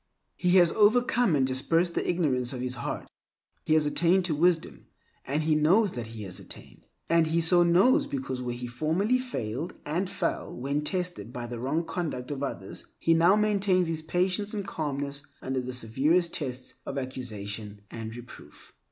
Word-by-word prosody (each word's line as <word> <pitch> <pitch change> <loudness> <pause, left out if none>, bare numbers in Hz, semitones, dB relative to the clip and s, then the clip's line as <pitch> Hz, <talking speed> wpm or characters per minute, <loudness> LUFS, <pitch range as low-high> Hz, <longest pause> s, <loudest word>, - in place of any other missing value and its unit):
He 180 -1 +1
has 175 -3 +6
overcome 230 -2 +3
and 135 -2 +3
dispersed 165 +7 +1
the - - -1
ignorance 135 -8 0
of 125 - -5
his 125 0 -2
heart. 120 - -5 0.6
He 155 - +4
has 155 -1 +4
attained 175 +5 +3
to 170 - 0
wisdom, 165 +2 +1 0.4
and 145 +4 0
he 155 0 +2
knows 180 +7 +4
that 120 -2 -5
he 110 -1 -8
has 95 -3 -6
attained. - - -12 0.2
And 165 -1 +3
he 165 +2 +1
so 175 +2 +5
knows 195 - +4
because 270 - -4
where 120 -1 -3
he 125 0 -6
formerly 160 - 0
failed 150 - -4
and 175 +6 -1
fell - - -3
when 140 +4 -1
tested 180 - -2
by 120 -1 -5
the 120 0 -6
wrong 145 +7 -1
conduct 160 -7 -4
of 140 -1 -4
others, 100 -8 -6
he 165 - +3
now 170 +4 +5
maintains 200 -4 +2
his 160 -1 -1
patience 185 +6 0
and 200 -2 -3
calmness 145 -4 -2 0.2
under 130 0 -2
the 125 0 -5
severest 140 +9 +1
tests 130 -4 -3
of 140 - -5
accusation 105 -5 -5
and 110 -1 -6
reproof. 120 0 -13
155 Hz, 180 wpm, -28 LUFS, 125-180 Hz, 0.6 s, has